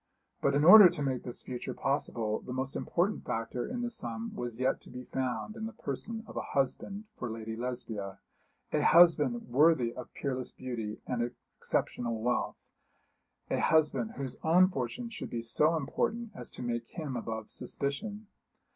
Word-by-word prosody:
But 140 Hz, -, +2 dB
in 145 Hz, -, +3 dB
order 200 Hz, +1 st, +12 dB
to 165 Hz, -4 st, -4 dB
make 130 Hz, -2 st, 0 dB
this 120 Hz, -1 st, -7 dB
future 125 Hz, -2 st, -5 dB
possible 115 Hz, -6 st, -1 dB
the 125 Hz, -, -7 dB
most 130 Hz, +2 st, -3 dB
important 185 Hz, +5 st, 0 dB
factor 115 Hz, +2 st, -3 dB
in 245 Hz, +1 st, -3 dB
the 240 Hz, -, -2 dB
sum 115 Hz, -, -4 dB
was 120 Hz, -1 st, -5 dB
yet 130 Hz, +1 st, +1 dB
to -, -, -15 dB
be 125 Hz, 0 st, -7 dB
found 130 Hz, -, -3 dB
in 220 Hz, -1 st, -4 dB
the 225 Hz, -, -8 dB
person 220 Hz, -, -5 dB
of -, -, -11 dB
a -, -, -1 dB
husband 195 Hz, +9 st, -1 dB, 0.2 s
for 120 Hz, -, -3 dB
Lady 110 Hz, 0 st, -5 dB
Lesbia 110 Hz, -5 st, -4 dB, 0.5 s
a -, -, +2 dB
husband 155 Hz, -8 st, +6 dB
worthy 130 Hz, -2 st, +4 dB
of 125 Hz, -1 st, -8 dB
peerless 130 Hz, -3 st, -3 dB
beauty 115 Hz, -4 st, -5 dB
and 120 Hz, -1 st, -1 dB, 0.3 s
exceptional 115 Hz, -2 st, -1 dB
wealth, 120 Hz, +2 st, 0 dB, 1.0 s
a -, -, +2 dB
husband 150 Hz, -8 st, +2 dB
whose 135 Hz, -1 st, -5 dB
own 180 Hz, +3 st, +6 dB
fortune 135 Hz, -, -3 dB
should 230 Hz, -, -6 dB
be 115 Hz, -1 st, -3 dB
so 150 Hz, +8 st, +3 dB
important 220 Hz, -, -1 dB
as -, -, -7 dB
to -, -, -8 dB
make 120 Hz, -1 st, -2 dB
him 150 Hz, -6 st, -5 dB
above 110 Hz, -2 st, -4 dB
suspicion. 205 Hz, +10 st, -4 dB
130 Hz, 170 wpm, -31 LUFS, 120-165 Hz, 1.0 s, order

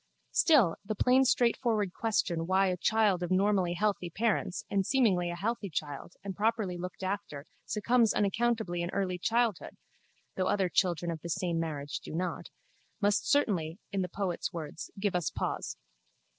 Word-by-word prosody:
Still 260 Hz, -, +4 dB
the 215 Hz, +2 st, -3 dB
plain 255 Hz, +5 st, +4 dB
straightforward 230 Hz, -6 st, +2 dB
question 180 Hz, -7 st, 0 dB
why 190 Hz, +1 st, +3 dB
a 180 Hz, -, -1 dB
child 210 Hz, -2 st, +2 dB
of 175 Hz, -, -2 dB
normally 185 Hz, -2 st, +2 dB
healthy 200 Hz, -2 st, 0 dB
parents 200 Hz, -1 st, -1 dB
and 195 Hz, -1 st, +1 dB
seemingly 190 Hz, -8 st, +2 dB
a 175 Hz, -, -3 dB
healthy 205 Hz, +2 st, -2 dB
child 150 Hz, +1 st, -5 dB
and 195 Hz, -2 st, -5 dB
properly 215 Hz, -3 st, 0 dB
looked 180 Hz, +2 st, -6 dB
after 185 Hz, -7 st, -4 dB, 0.2 s
succumbs 230 Hz, +1 st, +3 dB
unaccountably 210 Hz, -3 st, 0 dB
in 175 Hz, -, -2 dB
early 185 Hz, -2 st, -1 dB
childhood 230 Hz, 0 st, 0 dB, 0.6 s
(though 185 Hz, -, 0 dB
other 190 Hz, -3 st, +1 dB
children 175 Hz, -2 st, +1 dB
of 160 Hz, -2 st, -6 dB
the 170 Hz, -, -6 dB
same 170 Hz, 0 st, -1 dB
marriage 145 Hz, -3 st, -3 dB
do -, -, -8 dB
not) 180 Hz, +2 st, -3 dB, 0.5 s
must 205 Hz, -1 st, +1 dB
certainly, 180 Hz, -, +1 dB
in 195 Hz, -, 0 dB
the 180 Hz, -, -2 dB
poet's 195 Hz, +1 st, -2 dB
words, 160 Hz, -2 st, -6 dB
give 200 Hz, -2 st, 0 dB
us 175 Hz, -5 st, +1 dB
pause. -, -, -3 dB
190 Hz, 160 wpm, -30 LUFS, 175-215 Hz, 0.6 s, Still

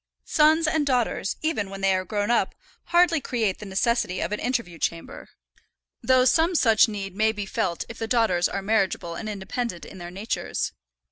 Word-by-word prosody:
Sons 315 Hz, +2 st, +4 dB
and 310 Hz, -1 st, +1 dB
daughters, 250 Hz, -7 st, 0 dB
even 220 Hz, -11 st, -1 dB
when 195 Hz, 0 st, -8 dB
they 195 Hz, 0 st, +3 dB
are 185 Hz, 0 st, 0 dB
grown 205 Hz, +4 st, -1 dB
up, 240 Hz, -, +1 dB, 0.3 s
hardly 345 Hz, -2 st, +3 dB
create 225 Hz, -8 st, -1 dB
the 210 Hz, -, -8 dB
necessity 195 Hz, -1 st, 0 dB
of -, -, -2 dB
an 210 Hz, -, -2 dB
interview 235 Hz, -10 st, -2 dB
chamber, 165 Hz, 0 st, -4 dB, 0.7 s
though 255 Hz, -1 st, +4 dB
some 330 Hz, +6 st, +3 dB
such 225 Hz, -8 st, +5 dB
need 195 Hz, -3 st, -5 dB
may 220 Hz, +1 st, +3 dB
be 205 Hz, -2 st, -5 dB
felt 175 Hz, -3 st, -2 dB
if 230 Hz, -, -10 dB
the 225 Hz, -, -3 dB
daughters 220 Hz, -8 st, +2 dB
are 195 Hz, -, -4 dB
marriageable 195 Hz, -5 st, 0 dB
and 215 Hz, +6 st, -5 dB
independent 205 Hz, 0 st, -4 dB
in 190 Hz, -, -11 dB
their 175 Hz, 0 st, -7 dB
natures. 195 Hz, +5 st, -3 dB
215 Hz, 185 wpm, -25 LUFS, 195-250 Hz, 0.7 s, such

